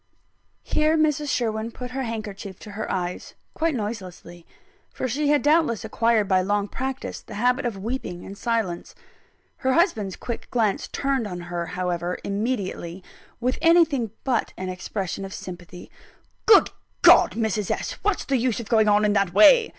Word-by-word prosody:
Here 310 +1 +2
Mrs. 300 -1 +1
Sherwin 225 -3 -1
put 250 +1 -8
her 265 +1 -3
handkerchief 210 -5 -5
to 210 - -9
her 215 +2 -4
eyes 180 -1 -4 0.2
quite 325 -2 0
noiselessly; 185 -6 -6 0.4
for - - -3
she 285 +5 -1
had 290 0 +3
doubtless 295 -8 +2
acquired 220 -1 +2
by 185 -1 +3
long 205 +2 0
practice 265 +4 -5
the - - -10
habit 245 +4 +1
of 220 -4 -4
weeping 195 -4 -4
in 195 - -8
silence. 215 -5 -2 0.6
Her 260 0 +1
husband's 225 - +1
quick 235 - -6
glance 220 -5 0
turned 270 -5 -1
on 180 -3 -6
her, 175 -1 -4
however, 180 -1 -2
immediately, 200 -4 -3 0.4
with 250 +2 -1
anything 325 -8 +4
but 250 -4 0
an 185 0 -4
expression 190 +1 -4
of 195 0 -6
sympathy. 180 -1 -9 0.6
"Good 420 -3 +7 0.3
God, - - +7
Mrs. 215 -3 -1
S.! - - -2
what's 405 -2 0
the 275 - +1
use 245 -1 0
of 230 -1 -7
going 220 -2 +4
on 210 0 +4
in 205 - +2
that 195 -3 +1
way?" 445 - +7
220 Hz, 165 wpm, -24 LUFS, 190-260 Hz, 0.6 s, Good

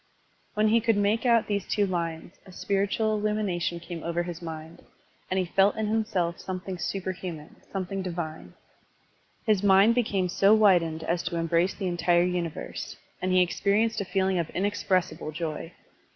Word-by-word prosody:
When 215 +1 +3
he 230 +1 +4
could 225 -2 +2
make 210 +4 +1
out 230 -2 +4
these 200 -2 -2
two 205 - +1
lines, 170 -2 -3
a 190 - -14
spiritual 205 +3 0
illtmiination 200 -5 -1
came 170 -1 -7
over 170 +1 -1
his 175 -1 -7
mind, 160 0 -8 0.5
and 185 - 0
he 185 - +1
felt 195 +3 +3
in 220 - -1
himself 205 -6 -1
something 185 -1 -5
superhuman, 180 -3 -5
some 190 -2 -2
thing 195 +2 -4
divine. 170 -3 -5 0.9
His 215 -4 +3
naind 200 +2 +6
became 205 -6 +1
so 195 +4 +4
widened 175 -7 +3
as 170 +2 0
to 175 0 -2
embrace 170 +2 +1
the 195 - -4
entire 175 -1 +2
universe, 175 -3 -4 0.2
and 185 - 0
he 185 0 +5
experi 200 +5 +1
enced 220 - -4
a - - -3
feeling 190 -1 +1
of 165 - -2
inexpressible 190 -4 -1
joy. 165 +1 -4
185 Hz, 165 wpm, -27 LUFS, 170-205 Hz, 0.9 s, naind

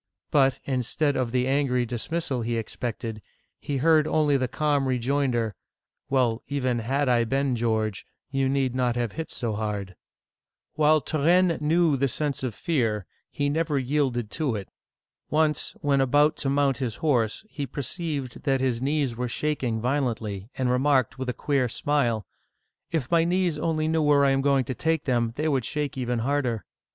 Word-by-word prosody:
" - - -67
But, 135 -3 +4
instead 140 +3 0
of 125 -3 -1
the 125 0 +1
angry 135 -3 +1
dis 120 -1 -4
mi^al 160 -7 -1
he 115 0 -1
expected, 115 -1 -4 0.4
he 145 - -3
heard 155 +2 +4
only 150 -2 +2
the 130 -2 +1
calm 145 0 0
rejoinder, 125 -3 0 0.3
" - - -57
Well, 125 -4 +2
even 130 -4 0
had 135 +5 0
I 120 -2 +3
been 135 +2 0
George, 110 -3 -1 0.3
you 135 -1 +1
need 135 -2 +1
not 125 -2 +1
have 120 -3 -1
hit 160 0 -5
so 115 -4 -2
hard! 105 -3 -3 0.4
" - - -65
While 155 0 +4
Turenne 170 +4 +2
knew 160 -1 +3
the 135 +1 +2
sense 145 +1 -2
of 125 -5 -3
fear, 115 - 0 0.2
he 145 -2 -1
never 155 0 0
yielded 130 -4 0
to 145 -7 -1
it. 100 -2 -6 0.6
Once, 155 +4 +1
when 140 -3 +2
about 145 +4 +3
to 135 - -1
mount 140 -1 +2
his 125 -5 -3
horse, 125 - 0
he 145 -9 -5
perceived 140 0 -4
that 135 -2 +1
his 125 -3 0
knees 140 -3 0
were 125 +1 -2
shaking 130 -5 -1
violently, 115 -6 -2
and 130 -1 0
remarked 130 -1 +2
with 130 -1 -3
a - - +2
queer 135 -3 0
smile, 120 -5 0 0.6
If 155 -5 -2
my 165 -1 +5
knees 175 -2 +1
only 155 0 0
knew 160 0 +1
where 145 -1 +4
I 135 - +4
am 135 0 +2
going 140 -1 +3
to 130 - -3
take 160 +3 0
them, 120 -4 +1
they 155 +2 -1
would 135 -5 +1
shake 150 +2 -2
even 125 -2 -1
harder 130 -6 0
135 Hz, 180 wpm, -26 LUFS, 120-150 Hz, 0.6 s, my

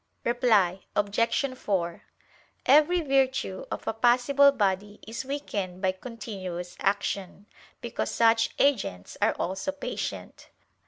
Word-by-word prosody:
Reply 215 -7 +2
Obj. 230 +6 +1
4: 180 -8 -2 0.6
Every 305 +6 +5
virtue 265 - 0
of - - -5
a - - 0
passible 250 +5 +4
body 205 -4 -1
is 230 +4 -5
weakened 205 -10 -4
by 190 - +3
continuous 185 -5 -7
action, 200 0 -2 0.4
because - - -3
such 225 0 +3
agents 195 - 0
are - - +3
also 190 +10 -3
patient. 285 - -6
225 Hz, 110 wpm, -27 LUFS, 190-260 Hz, 0.6 s, Every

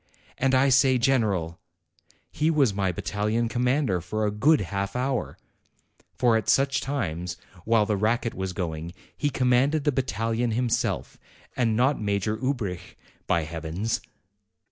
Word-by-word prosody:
And 135 0 +2
I 135 +1 +4
say 130 0 +4
general! 105 - +1 0.7
He 155 +1 +1
was 140 -9 +3
my 95 -2 0
battalion 105 +4 -1
commander 125 - +1
for 105 +5 -2
a 105 - 0
good 135 +8 +3
half 100 +2 -3
hour; 130 -1 -2 0.8
for 120 -2 +3
at 110 -3 0
such 135 -1 +3
times, 90 - -3 0.3
while 115 -1 +3
the 105 0 0
racket 115 +3 0
was 95 0 -3
going, 85 -3 -4 0.2
he 145 - 0
commanded 135 +3 +2
the 150 - +2
battalion 115 -2 -1
himself, 120 0 -1 0.4
and 115 -3 +1
not 130 +2 +2
Major 100 +1 0
Ubrich, 110 -9 -3 0.3
by 85 -1 +2
Heavens!" 85 +7 -3
115 Hz, 140 wpm, -26 LUFS, 100-130 Hz, 0.8 s, I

